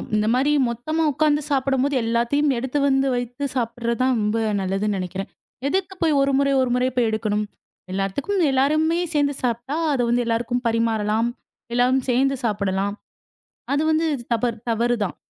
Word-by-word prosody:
இந்த 210 0 +1
மாரி 265 +4 +2 0.2
மொத்தமா 310 +8 -2
உக்காந்து 295 +1 +2
சாப்படம்போது 270 0 +1
எல்லாத்தையும் 235 +6 +1
எடுத்து 260 +4 -2
வந்து 270 0 +2
வைத்துச் 245 +3 -3
சாப்பிடுறது 235 0 -2
தான் 255 0 +3
ரொம்ப 210 +2 0 0.2
நல்லதுன்னு 195 +2 -1
நினைக்கிறேன். 185 +2 -5 0.4
எதுக்கு 380 +5 -1
போய் 315 -4 +3
ஒரு 275 - +2
முறை 275 0 +2
ஒரு 255 - +1
முறை 250 +1 +2
போய் 245 -2 +2
எடுக்கணும். 210 -1 -1 0.5
எல்லாத்துக்கும் 195 - -1
எல்லாருமே 310 +5 +2
சேந்து 285 -2 +1
சாப்ட்டா 245 +4 -1 0.2
அது 265 - +1
வந்து 245 0 +2
எல்லாருக்கும் 240 +2 -1
பரிமாறலாம். 225 0 +1 0.4
எல்லாரும் 250 +2 +2
சேந்து 270 +2 +2
சாப்படலாம். 200 -2 -1 0.8
அது 285 - +2
வந்து 315 +1 +2 0.3
தவறு- 230 -1 -1
தவறு 235 +2 +1
தான். 190 - -4
245 Hz, 150 wpm, -22 LUFS, 225-280 Hz, 0.8 s, தான்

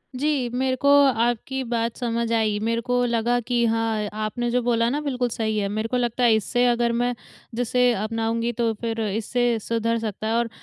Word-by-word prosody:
जी। 275 -2 0
मेरे 260 +2 0
को 280 +3 +1 0.2
आपकी 240 +2 0
बात 230 -1 -1
समझ 235 -1 -2
आई, 215 -2 +1
मेरे 230 +1 0
को 245 +1 0
लगा 235 +1 +1
कि 240 -1 +2
हाँ, 225 -2 0
आपने 215 +3 -2
जो 250 +1 +1
बोला 230 -1 +2
ना 290 +4 -1
बिल्कुल 255 -4 -1
सही 220 -1 -2
है। 200 -1 0
मेरे 215 +2 -2
को 250 - 0
लगता 245 0 -1
है 230 -2 +5
इससे 245 +3 +1
अगर 240 -1 +2
मैं 245 0 +1 0.4
जिसे 245 +1 +2
अपनाऊँगी 225 +2 -1
तो 230 -1 +1
फिर 230 -1 -2
इससे 230 +3 0
सुधर 230 +1 -1
सकता 215 -1 -4
है 220 - 0
और 235 0 +1
235 Hz, 200 wpm, -23 LUFS, 225-245 Hz, 0.4 s, है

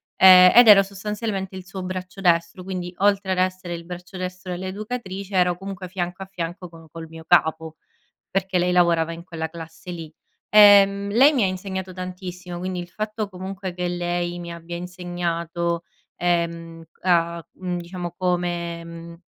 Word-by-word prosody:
ehm, 185 -1 +9
ed 240 -1 +9
ero 200 -1 +10
sostanzialmente 200 -1 -4
il 185 - -9
suo 190 -1 -7
braccio 185 +1 -6
destro 170 0 +1
quindi 180 -1 -5
a 200 +1 +4 0.3
essere 185 -1 -4
il 170 0 -7
braccio 180 +2 -9
destro 185 0 -5
dell’educatrice 195 +1 -5
ero 180 -1 +3
comunque 195 -1 -7
fianco 185 0 -4
a - - -9
fianco 175 +1 -5
co 165 -1 -15
col 165 +1 -9
mio 160 0 -11
capo, 160 -2 +2 0.6
perché 190 -1 0
lei 180 0 +1
lavorava 170 -2 +3
in 170 0 -8
quella 160 -3 -5
classe 165 +2 -10
lì. 165 -2 -8 0.4
Ehm, 200 -1 +7
lei 265 +8 +6
mi 245 - +2
ha - - +4
insegnato 190 0 -4
tantissimo 180 -1 -7
quindi 185 0 -4
il 175 - -8
fatto 215 +2 -4
comunque 190 0 -6
che 180 0 -2
lei 175 0 -2
mi 170 -1 -7
abbia 170 +1 -7
insegnato, 170 -1 -3 0.3
ehm, 170 -1 -1 0.2
a 170 -2 +2
c - - -39
diciamo 175 -1 -5
come 175 -2 -1
mhmm, 170 0 -10
180 Hz, 160 wpm, -23 LUFS, 170-190 Hz, 0.6 s, ero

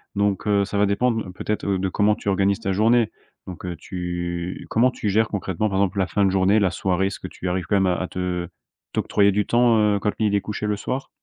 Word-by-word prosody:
Donc, 100 0 0
heu, 100 -1 +3
ça 100 - -4
va 100 - +4
dépendre, 110 +3 0
heu, 90 - -8
peut-être, 105 +3 -3
heu, 100 -1 +1
de 95 0 -1
comment 105 +3 +2
tu - - -11
organises 100 0 +2
ta 95 - -2
journée. 115 +3 +3 0.4
Donc, 90 -1 -8
heu, 90 - -4
tu 85 0 -4
comment 125 +3 +3
tu 105 - -3
gères 110 +2 +2
concrètement, 100 0 -2
par 95 - -1
exemple, 100 0 +1
la 95 - +1
fin 100 +1 +1
de - - +3
journée, 95 +3 +3
la 95 -3 +2
soirée? 95 +2 0
Est-ce 100 - -5
que - - -6
tu 95 - -7
arrives 90 0 -2
quand 100 - 0
même 95 -1 +2
à 90 - +2
à 95 - -3
te 90 -1 -3 0.4
t'octroyer 100 -1 +2
du 105 +1 0
temps, 120 -1 +4
heu, 105 -1 +3
quand 105 +1 0
il 105 -2 +2
est 100 - +2
couché 105 +1 -4
le 105 - 0
soir? 130 +7 -4
100 Hz, 255 wpm, -23 LUFS, 95-105 Hz, 0.4 s, va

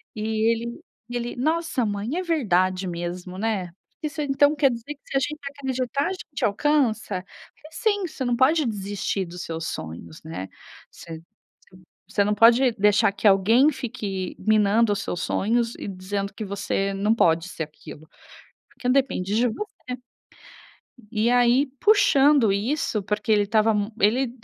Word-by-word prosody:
e 215 - -5 0.3
ele 235 +1 -4 0.3
e 245 - -6
ele: 240 0 -3
"Nossa, 310 -1 0
mãe, 210 - -3
é - - 0
verdade 185 - +1
mesmo, 175 +1 -5
né, 200 -5 -2 0.3
isso 305 0 -4
então 285 +1 +3
quer 280 -3 +3
dizer 235 +5 -6
que - - -41
se 270 - -2
a - - +4
gente 300 +3 -3 0.2
acreditar 265 +1 -1
a - - -2
gente 320 -5 -4
alcança?". 220 -5 0
Falei: - - -34 0.5
"Sim, 410 -1 0
você 285 -4 -6
não 245 -1 +1
pode 290 +5 +3
desistir 200 -3 -2
dos 175 +1 -8
seus 165 0 -5
sonhos, 80 0 -7
né, 155 - -6 0.4
você 165 -1 -10 0.5
você 185 - -16 0.3
você 205 0 +1
não 210 - +1
pode 240 +4 +6
deixar 205 -1 +3
que 205 - 0
alguém 225 +9 +5
fique 210 -9 -5
minando 215 +1 +3
os 200 - -3
seus 175 - -4
sonhos 230 +5 0
e - - -7
dizendo 195 +1 -4
que 215 - -6
você 195 0 -2
não 205 +3 +1
pode 165 -4 +2
ser 165 - -4
aquilo, 155 0 -12 0.6
porque 250 - -4
depende 255 -8 +1
de 245 +2 +3
você". 420 - -5 1.4
E 230 +2 +1
aí 245 +2 +4
puxando 290 - +5
isso, 220 0 -1
porque 210 +2 -2
ele 210 -1 +5
estava 215 +2 +2
m 205 +1 -1
ele 235 +5 +2
220 Hz, 160 wpm, -24 LUFS, 195-265 Hz, 1.4 s, pode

